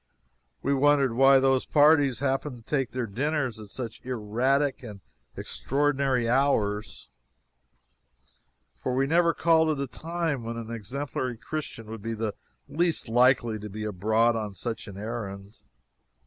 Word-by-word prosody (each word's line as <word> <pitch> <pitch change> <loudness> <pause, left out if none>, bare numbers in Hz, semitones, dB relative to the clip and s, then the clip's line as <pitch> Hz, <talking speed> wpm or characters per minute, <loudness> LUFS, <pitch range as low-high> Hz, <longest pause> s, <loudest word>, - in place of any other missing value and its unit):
We 140 - +1
wondered 140 -2 +3
why 135 +2 +6
those 135 -1 +2
parties 145 -5 +4
happened 135 -1 -1
to 115 - -16
take 135 +1 -1
their 125 -1 -3
dinners 130 +1 -2
at 105 - -9
such 115 0 -7
erratic 130 +4 0
and 105 -5 -9 0.4
extraordinary 135 -3 0
hours, 115 -5 0 1.7
for 125 - -1
we 135 +1 +2
never 170 +3 +3
called 160 -1 +3
at 150 -3 0
a 140 - -1
time 165 0 -3
when 115 +1 -5
an 115 0 -6
exemplary 125 +2 -4
Christian 120 -2 -6
would 110 0 -8
be 115 +2 -3
in - - -6
the 110 -2 -2 0.3
least 160 -2 0
likely 120 -2 +3
to 105 +1 -7
be 105 +2 -6
abroad 110 +3 +2
on 105 -3 -4
such 115 +2 -5
an 100 -2 -9
errand. 100 -2 -6
125 Hz, 150 wpm, -27 LUFS, 110-140 Hz, 1.7 s, why